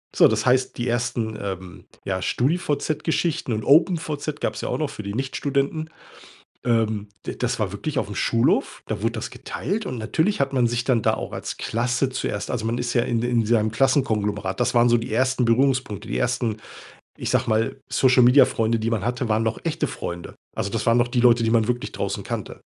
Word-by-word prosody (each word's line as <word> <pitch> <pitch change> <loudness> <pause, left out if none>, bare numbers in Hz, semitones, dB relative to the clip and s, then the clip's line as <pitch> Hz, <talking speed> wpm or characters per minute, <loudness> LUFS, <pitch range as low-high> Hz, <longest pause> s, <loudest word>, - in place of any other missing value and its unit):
So, - - +7
das - - 0
heißt, 130 +1 +2
die 120 +1 -2
1., 120 -2 -1
ähm, 95 -2 -6 0.2
ja 95 -1 -2
StudiVZ 150 - 0
Geschichten 160 -7 0
und 110 0 -2
OpenVZ 155 - +2
gab's - - -2
ja - - -3
auch - - -1
noch 150 -3 -1
für 105 - -8
die 100 +1 -5
Nichtstudenten. 140 +4 -1 0.8
Ähm, 110 -3 +1 0.2
de - - -4
das 125 -1 -1
war 100 -3 -1
wirklich 145 +7 -4
aufm 105 -4 -4
Schulhof, 115 0 +1
da - - -3
wurde - - 0
das - - -4
geteilt 200 - -4
und 130 - -4
natürlich 160 - 0
hat 140 0 0
man 125 -2 +3
sich 120 0 -1
dann 120 -4 +2
da - - +2
auch - - -6
als - - -5
Klasse 120 +3 0
zuerst 130 - -3
also 115 -3 -2
man 115 +2 -1
ist 120 0 -2
ja 120 - +3
in 115 -1 0
de 120 - -1
in 115 -2 +2
seinem 110 -1 +2
Klassenkonglomerat. 105 -7 +1
Das - - +1
waren 120 0 +5
so 120 - +5
die 115 -1 -5
1. 130 +1 +2
Berührungspunkte, 125 -2 +1
die - - -1
1., 120 -3 0 0.6
ich - - -3
sage 125 -1 +1
mal, 110 +4 +1
Social 125 -1 +4
Media 125 +3 +7
Freunde, 115 0 0
die 115 +1 -1
man 110 -4 -1
hatte, 125 0 -1
waren 110 +1 +2
noch 110 0 -1
echte 165 -1 -1
Freunde. 85 0 -6 0.2
Also, 100 - -2
das 115 - -2
waren 115 +1 +4
noch 120 0 +3
die 120 -1 +1
Leute, 120 -1 +5
die 115 - +1
man 115 -1 +3
wirklich 125 0 -2
draußen - - -3
kannte. - - -5
120 Hz, 215 wpm, -23 LUFS, 110-130 Hz, 0.8 s, So